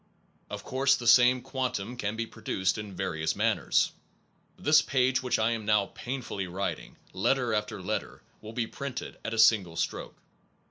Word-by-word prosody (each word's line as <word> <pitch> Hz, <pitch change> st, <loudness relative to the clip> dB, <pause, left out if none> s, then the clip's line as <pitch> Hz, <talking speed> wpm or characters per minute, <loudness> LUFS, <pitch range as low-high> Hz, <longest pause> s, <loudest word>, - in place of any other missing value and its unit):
Of -, -, -6 dB
course 135 Hz, +1 st, +2 dB
the 125 Hz, -, -6 dB
same 125 Hz, +2 st, +6 dB
quantum 125 Hz, -4 st, -3 dB
can 105 Hz, -3 st, -3 dB
be 115 Hz, 0 st, -2 dB
produced 95 Hz, -4 st, -2 dB
in 105 Hz, -3 st, -7 dB
various 80 Hz, -4 st, -1 dB
manners. -, -, +2 dB, 0.7 s
This 155 Hz, +2 st, +5 dB
page 130 Hz, -1 st, +1 dB
which 125 Hz, -1 st, 0 dB
I 110 Hz, +1 st, +2 dB
am 115 Hz, -2 st, -2 dB
now 105 Hz, -1 st, +2 dB
painfully 120 Hz, -7 st, -4 dB
writing, 95 Hz, +3 st, -4 dB, 0.2 s
letter 120 Hz, +5 st, +1 dB
after 105 Hz, -1 st, -2 dB
letter, 90 Hz, -, -4 dB, 0.2 s
will 110 Hz, +1 st, -9 dB
be 120 Hz, -1 st, -1 dB
printed 140 Hz, +2 st, -6 dB
at 115 Hz, -, -3 dB
a -, -, -5 dB
single 105 Hz, -6 st, +4 dB
stroke. 85 Hz, -, -3 dB
115 Hz, 160 wpm, -29 LUFS, 100-125 Hz, 0.7 s, same